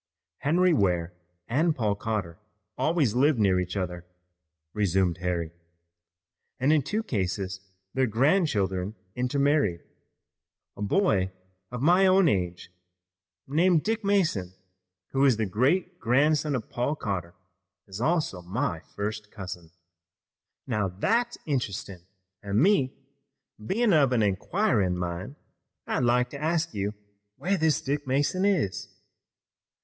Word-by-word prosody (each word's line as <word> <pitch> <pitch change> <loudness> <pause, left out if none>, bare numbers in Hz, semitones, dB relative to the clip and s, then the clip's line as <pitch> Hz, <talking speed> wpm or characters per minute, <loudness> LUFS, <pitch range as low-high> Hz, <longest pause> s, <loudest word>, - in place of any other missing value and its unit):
"Henry 175 +4 +3
Ware 90 - +1 0.3
and 155 +7 +2
Paul 105 -4 +1
Cotter 100 -5 -3 0.4
always 145 -3 +1
lived 135 +3 +3
near 95 -4 +3
each 90 +2 -3
other," 90 -2 -3 0.7
resumed 95 -3 +1
Harry, 85 -3 -2 1.1
"and 140 +4 +3
in 155 - +4
two 215 - -2
cases 95 - -2 0.3
their 130 -1 +2
grandchildren 110 - +1 0.2
intermarried. 125 - +1 0.9
A - - -10
boy 100 - +2 0.4
of 125 +1 -5
my 180 +5 +5
own 185 -1 +5
age 90 - -1 0.7
named 160 +3 +3
Dick 225 0 -1
Mason, 155 - +1 0.6
who 135 0 +2
is 130 -5 +4
the 110 - 0
great 155 - 0
grandson 145 +4 +2
of 115 -4 -4
Paul 125 +5 -1
Cotter, 90 - -4 0.5
is 95 +2 -8
also 155 - 0
my 95 - -2 0.2
first 105 0 -4
cousin." 90 -5 -8 1.0
"Now 105 -6 0
that's 230 - 0
interestin' 100 - -3 0.3
an' 100 +1 0
me 165 - +3 0.7
bein' 210 - +2
of 140 -5 +4
an 115 -3 +3
inquirin' 100 - +1
min', 90 +9 -4 0.5
I'd - - -1
like 125 +1 +2
to 140 - -7
ask 165 +1 0
you 100 +1 -2 0.4
where 180 +9 0
this 160 -5 +2
Dick 145 +1 -2
Mason 145 +8 +1
is." 175 - 0
125 Hz, 125 wpm, -27 LUFS, 95-155 Hz, 1.1 s, my